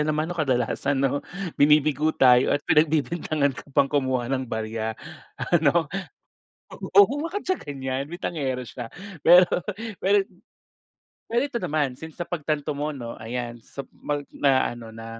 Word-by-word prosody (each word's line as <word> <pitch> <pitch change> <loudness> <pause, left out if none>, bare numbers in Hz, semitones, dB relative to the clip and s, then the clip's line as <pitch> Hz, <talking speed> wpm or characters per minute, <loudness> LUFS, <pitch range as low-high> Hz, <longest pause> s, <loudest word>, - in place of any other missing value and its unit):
naman, 155 +2 0
'no, - - -10
kadalasan, 130 +1 0
'no? 140 +1 +1 0.4
Binibigo 150 +1 +4
tayo 125 +1 +5
at 145 - -10
pinagbibintangan 155 -2 +2
ka 135 - -11
pang 140 - +5
kumuha 130 -3 0
ng 130 -2 -2
barya. 110 0 -3 0.6
Ano? 165 0 +3 1.1
O, 405 - +11
huwag 330 +6 -4
siyang 370 0 -1
ganyan, 135 -2 -4
bintangero 145 -7 -3
siya, 120 0 -7 0.3
pero 175 +4 +8 0.6
pero 195 +1 +3 1.0
Pero 235 +3 +1
ito 275 -5 -3
naman, 155 -6 0
since 160 0 -9
napagtanto 155 -3 -2
mo, 145 +1 -3
'no, 120 -3 -7
ayan 120 +1 -5
sa 140 +4 -8
mag 145 -1 -4
na 135 -2 +3
ano 115 -2 -10
na 115 0 -8
145 Hz, 140 wpm, -25 LUFS, 125-160 Hz, 1.1 s, O